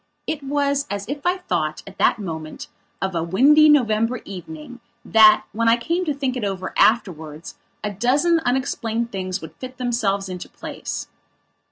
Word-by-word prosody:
It 305 Hz, -, -3 dB
was 280 Hz, 0 st, 0 dB
as 200 Hz, 0 st, -4 dB
if 285 Hz, +5 st, -4 dB
I 360 Hz, +1 st, +2 dB
thought, 155 Hz, -, -2 dB
at 195 Hz, 0 st, -13 dB
that -, -, +4 dB
moment, 160 Hz, -6 st, -7 dB, 0.3 s
of 190 Hz, -1 st, -1 dB
a 165 Hz, -, -1 dB
windy 280 Hz, -, +5 dB
November 230 Hz, -4 st, +2 dB
evening, 180 Hz, +4 st, -9 dB, 0.3 s
that, 215 Hz, -1 st, +6 dB
when 230 Hz, +1 st, 0 dB
I 230 Hz, -, +5 dB
came 340 Hz, +9 st, -1 dB
to 300 Hz, -, 0 dB
think 265 Hz, -2 st, -2 dB
it 250 Hz, -, -3 dB
over 190 Hz, -2 st, -3 dB
afterwards, 170 Hz, -8 st, 0 dB, 0.2 s
a 210 Hz, -, -2 dB
dozen 280 Hz, -, +2 dB
unexplained 240 Hz, -4 st, -1 dB
things 185 Hz, -2 st, -3 dB
would 160 Hz, -, -10 dB
fit 255 Hz, 0 st, -8 dB
themselves 220 Hz, -6 st, -1 dB
into 180 Hz, -1 st, -7 dB
place. -, -, -6 dB
230 Hz, 165 wpm, -22 LUFS, 190-275 Hz, 0.3 s, that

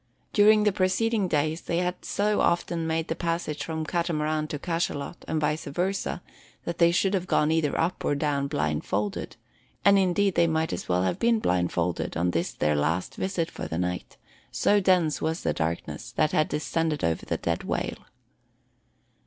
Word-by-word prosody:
During 210 Hz, 0 st, +6 dB
the 210 Hz, -, +4 dB
preceding 195 Hz, +2 st, +1 dB
days 155 Hz, +1 st, 0 dB
they 170 Hz, -, -2 dB
had 180 Hz, 0 st, -2 dB
so 210 Hz, +1 st, +1 dB
often 170 Hz, -1 st, +1 dB
made 160 Hz, 0 st, -1 dB
the 165 Hz, -, -2 dB
passage 165 Hz, -4 st, -2 dB
from 160 Hz, 0 st, -3 dB
Catamaran 155 Hz, -2 st, -1 dB
to 150 Hz, -, -4 dB
cachalot, 165 Hz, -1 st, -3 dB
and 160 Hz, -, 0 dB
vice 150 Hz, +1 st, -1 dB
versa, 180 Hz, +3 st, -2 dB, 0.4 s
that 170 Hz, -, -4 dB
they 170 Hz, -1 st, +6 dB
could 190 Hz, +3 st, +2 dB
have 185 Hz, -2 st, -1 dB
gone 150 Hz, -3 st, +2 dB
either 160 Hz, -3 st, +1 dB
up 170 Hz, +3 st, 0 dB
or 145 Hz, -, +1 dB
down 140 Hz, -1 st, 0 dB
blindfolded; 100 Hz, -, -2 dB, 0.5 s
and 200 Hz, 0 st, +7 dB
indeed 195 Hz, +1 st, +2 dB
they 170 Hz, 0 st, +3 dB
might 160 Hz, 0 st, 0 dB
as -, -, -5 dB
well 90 Hz, 0 st, +2 dB
have 90 Hz, -1 st, -1 dB
been 235 Hz, 0 st, +3 dB
blindfolded 90 Hz, -, 0 dB
on 90 Hz, +1 st, +1 dB
this 85 Hz, 0 st, -1 dB
their 75 Hz, 0 st, 0 dB
last 80 Hz, +5 st, 0 dB
transit 180 Hz, -4 st, -2 dB
for -, -, -6 dB
the 80 Hz, -, -4 dB
night, 90 Hz, 0 st, -3 dB, 0.3 s
so 205 Hz, -, +3 dB
dense 180 Hz, -5 st, +2 dB
was 160 Hz, +2 st, -1 dB
the -, -, +1 dB
darkness 80 Hz, +1 st, -3 dB
that 155 Hz, -, +2 dB
had 155 Hz, -, +2 dB
descended 155 Hz, 0 st, -1 dB
over 85 Hz, -1 st, 0 dB
the -, -, -2 dB
dead 85 Hz, -1 st, -2 dB
whale. -, -, -3 dB
160 Hz, 175 wpm, -26 LUFS, 140-180 Hz, 0.5 s, and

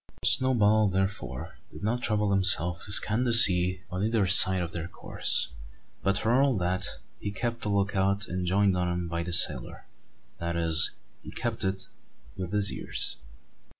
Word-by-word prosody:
Snowball, 110 Hz, -5 st, +2 dB
therefore, 95 Hz, -9 st, -6 dB
did -, -, -14 dB
not 120 Hz, +4 st, -3 dB
trouble 105 Hz, -3 st, -2 dB
himself 90 Hz, -3 st, +2 dB
to 100 Hz, -, -9 dB
scan 110 Hz, +3 st, +2 dB
the 120 Hz, -, -2 dB
sea 90 Hz, -4 st, +6 dB
on 90 Hz, +2 st, -5 dB
either 110 Hz, -2 st, -1 dB
side 95 Hz, 0 st, +5 dB
of 85 Hz, -, -8 dB
their 85 Hz, 0 st, -7 dB
course; -, -, -3 dB, 0.5 s
but 100 Hz, +1 st, -1 dB
for 120 Hz, +5 st, 0 dB
all 135 Hz, -5 st, 0 dB
that 90 Hz, 0 st, -1 dB, 0.3 s
he 100 Hz, -, -6 dB
kept 115 Hz, +4 st, -6 dB
the 105 Hz, -, -5 dB
look 100 Hz, 0 st, -2 dB
out 100 Hz, +1 st, -1 dB
enjoined 95 Hz, +2 st, -1 dB
on 90 Hz, -1 st, -3 dB
him 85 Hz, 0 st, -5 dB
by 85 Hz, 0 st, -5 dB
the 85 Hz, +1 st, -7 dB
sailor, 85 Hz, -, -1 dB, 0.5 s
that 85 Hz, 0 st, -5 dB
is, 80 Hz, -2 st, +5 dB, 0.3 s
he -, -, -13 dB
kept -, -, -6 dB
it 95 Hz, 0 st, -4 dB, 0.5 s
with 95 Hz, -2 st, -8 dB
his 105 Hz, -1 st, +1 dB
ears! -, -, -5 dB
95 Hz, 170 wpm, -25 LUFS, 90-105 Hz, 0.5 s, sea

